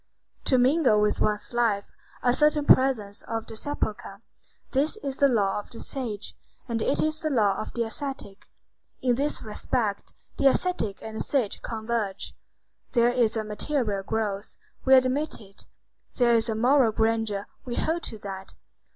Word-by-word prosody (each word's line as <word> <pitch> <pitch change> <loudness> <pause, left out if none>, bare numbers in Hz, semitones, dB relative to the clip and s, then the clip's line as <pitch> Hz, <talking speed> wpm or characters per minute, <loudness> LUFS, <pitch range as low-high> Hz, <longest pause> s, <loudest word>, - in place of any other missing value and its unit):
To 260 - +4
mingle 255 -3 +4
with 210 0 +1
one's 210 +2 0
life 225 -4 +1 0.3
a 245 - +4
certain 300 +1 +3
presence 225 -8 +4
of 225 -1 -3
the 225 - -9
sepulchre,—this 240 - -4
is 275 -1 -4
the 280 - +6
law 210 -6 +1
of 205 - -10
the 230 - -10
sage; 225 -7 -5 0.3
and 230 -2 -2
it 275 - +1
is 310 0 0
the 310 - -1
law 215 -8 +2
of - - -7
the 235 - 0
ascetic. 225 -4 -6 0.6
In 250 -1 +3
this 285 +5 0
respect, 215 -1 -2 0.2
the 275 - +5
ascetic 270 - 0
and 220 0 -6
the - - -1
sage 250 -8 -1
converge. 220 -3 -3 0.6
There 240 0 +4
is 235 -2 +2
a 220 - -1
material 215 -1 -1
growth; 205 0 -3 0.3
we 265 0 +8
admit 260 +4 +2
it. 195 -2 -14 0.5
There 240 -2 +4
is 230 0 +2
a 220 - 0
moral 250 +1 +4
grandeur; 220 -2 0 0.2
we 240 -2 -4
hold 330 +2 0
to 220 - -5
that. 195 -1 -7
230 Hz, 160 wpm, -26 LUFS, 210-265 Hz, 0.6 s, we